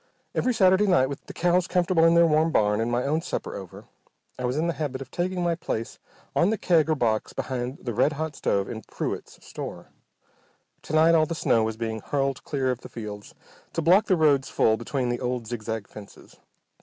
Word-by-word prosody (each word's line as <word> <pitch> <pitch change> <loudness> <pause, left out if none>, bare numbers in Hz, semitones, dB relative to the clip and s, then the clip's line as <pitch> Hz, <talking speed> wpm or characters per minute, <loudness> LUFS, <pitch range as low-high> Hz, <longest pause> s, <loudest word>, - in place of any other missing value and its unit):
Every 255 - +1
Saturday 190 -2 +4
night, 150 -9 +3
with 140 - -7
the - - -7
cows 175 +1 +2
comfortable 180 -2 +2
in 165 0 +5
their 170 0 +6
warm 155 0 +3
barn, 105 -4 +2
and 115 +1 -1
my 120 +1 +1
own 155 +3 0
supper - - -4
over, - - -9 0.5
I 125 - -2
was 125 +3 -1
in 160 - +1
the 170 - 0
habit 145 -5 -3
of 130 -1 -9
taking 180 0 -2
my 170 -1 +2
place 115 -8 -4 0.4
on 170 - +3
the 220 - 0
keg 165 -5 +2
or 155 - +3
box 110 -5 0
behind 130 0 -3
the 120 - -3
red 145 +8 +2
hot 155 0 -4
stove 100 -1 0
in 110 -2 -6
Pruett's - - -6
store. - - -7 0.9
To - - -8
night 160 +2 +5
all 155 -1 +4
the 165 - -3
snow 115 -7 +2
was 110 0 -2
being 110 -1 -3
hurled 135 +3 -2
clear 135 -3 -1
of 125 - -5
the - - -10
fields 105 -3 -8 0.4
to 165 - -1
block 190 +6 +5
the 185 - +3
roads 145 -4 +3
full 110 - +3
between 125 +2 -2
the 120 - -1
old, 125 -2 -2
zigzag 110 -2 -4
fences. 105 -2 -13
140 Hz, 215 wpm, -25 LUFS, 120-165 Hz, 0.9 s, their